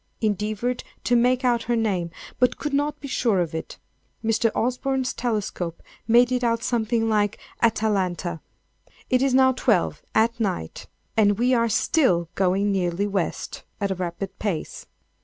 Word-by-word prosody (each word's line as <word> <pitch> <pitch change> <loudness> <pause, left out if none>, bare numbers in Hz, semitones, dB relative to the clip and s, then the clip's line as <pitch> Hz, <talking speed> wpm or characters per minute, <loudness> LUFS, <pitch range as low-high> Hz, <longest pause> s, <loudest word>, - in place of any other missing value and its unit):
Endeavored 215 +3 -1 0.2
to 245 - +2
make 250 +2 +3
out 240 -2 +3
her 240 +1 0
name, 195 -7 0 0.3
but 250 -1 +3
could 295 -2 -4
not 290 +1 0
be 285 - -7
sure 230 -7 +1
of 170 -2 -1
it. 160 - -5 0.5
Mr. 225 +1 +2
Osborne's 255 +2 0
telescope 200 -7 -3 0.2
made 240 +2 +5
it 250 0 0
out 230 -1 +1
something 225 -1 0
like 210 -2 +1 0.2
"Atalanta." 195 -7 0 0.7
It 255 0 +4
is 270 -1 +2
now 260 0 +6
12, 235 -7 +1
at 230 +2 +2
night, 185 - -3 0.3
and 205 -2 +4
we 250 +3 +2
are 230 -1 +2
still 200 - +2
going 195 +2 +1
nearly 185 0 0
west, 195 -4 -3 0.2
at 200 -1 -1
a - - +2
rapid 185 +2 -5
pace. 195 -7 -4
225 Hz, 155 wpm, -24 LUFS, 195-245 Hz, 0.7 s, now